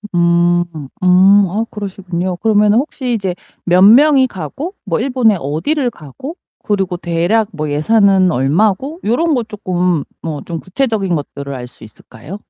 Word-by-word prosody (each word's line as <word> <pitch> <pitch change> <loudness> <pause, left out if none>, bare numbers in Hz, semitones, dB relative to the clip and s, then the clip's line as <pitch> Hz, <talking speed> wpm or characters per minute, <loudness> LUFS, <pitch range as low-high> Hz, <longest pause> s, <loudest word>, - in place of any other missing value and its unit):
음. 175 0 +3 0.4
음. 190 +3 +5
아 215 +5 -2
그러시군요. 185 -3 -4
그러면은 210 +1 +3
혹시 260 -3 -3
이제 195 -5 -2 0.3
몇 180 +1 +3
명이 260 +6 +6
가고 235 - -6
뭐 170 -5 -1
일본에 245 -3 +2
어디를 245 - -1
가고 170 - -10 0.3
그리고 195 -4 -1
대략 175 +6 0
뭐 155 -3 -4
예산은 190 +4 +3
얼마고 195 - 0
요런 310 +9 +1
거 245 - 0
쪼끔 180 -7 -1 0.2
뭐 155 -3 -5
좀 165 -2 -5
구체적인 195 -3 -1
것들을 140 -1 -6
알 125 -2 -7
수 120 - -18
있을까요? 115 - -11
190 Hz, 300 characters per minute, -16 LUFS, 170-225 Hz, 0.4 s, 명이